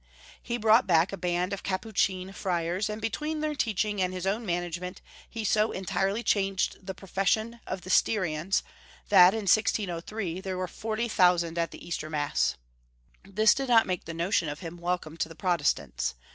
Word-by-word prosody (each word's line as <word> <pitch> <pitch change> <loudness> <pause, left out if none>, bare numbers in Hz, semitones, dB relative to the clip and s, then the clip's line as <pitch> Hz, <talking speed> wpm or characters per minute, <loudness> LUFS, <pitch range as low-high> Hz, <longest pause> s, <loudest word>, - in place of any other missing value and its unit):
He 240 0 -3
brought 225 +1 +4
back 170 +2 +3
a - - 0
band 180 +1 -1
of 200 - -4
Capuchin 190 -1 -1
Friars, 180 +2 -1
and 210 +1 -4
between 300 +8 -2
their 305 0 -1
teaching 215 -6 -1
and 185 0 +1
his 185 0 -5
own 210 +3 -1
management 175 +1 -3 0.3
he 225 -1 -5
so 215 +1 +2
entirely 195 +3 -1
changed 195 -3 0
the 190 - -4
profession 200 +5 -1
of 185 - -4
the 185 - -6
Styrians 185 -4 +2 0.5
that, 190 0 +7
in 220 - -2
1603, 190 -2 0
there 190 -1 -4
were 185 0 -2
40,000 180 -7 +1
at 165 - 0
the - - -11
Easter 155 -2 -4
Mass. 150 -1 0 0.7
This 210 +3 +4
did 270 0 -3
not 230 -2 +6
make 180 -2 -3
the 165 - -6
notion 170 -1 +1
of 145 +2 -6
him 170 -1 -7
welcome 170 -2 -3
to 160 - -2
the 165 - -11
Protestants. 165 - 0
190 Hz, 175 wpm, -28 LUFS, 175-215 Hz, 0.7 s, that